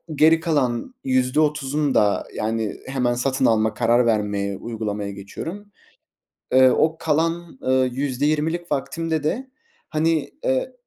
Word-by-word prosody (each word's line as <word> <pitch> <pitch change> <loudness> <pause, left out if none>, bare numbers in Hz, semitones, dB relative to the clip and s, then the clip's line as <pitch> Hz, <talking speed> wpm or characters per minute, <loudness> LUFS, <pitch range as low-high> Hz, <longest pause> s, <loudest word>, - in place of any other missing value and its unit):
geri 160 +2 +5
kalan 145 - -1
%30'unu 140 +2 +1
da, 105 -1 +2
yani, 110 0 -2
hemen 125 -2 0
satın 130 +2 0
alma, 110 -1 +3
karar 120 +2 +3
vermeye, 100 -3 0
uygulamaya 105 -2 -4
geçiyorum. 165 - -8 0.8
Eee, 130 0 +7
o 160 +5 +2
kalan, 165 0 -1
eee, 130 0 +2
%20'lik 150 +6 -1
vaktimde 160 +2 -2
de, 240 - -2 0.4
hani, 160 -1 0
eee, 130 - 0
130 Hz, 115 wpm, -22 LUFS, 115-155 Hz, 0.8 s, Eee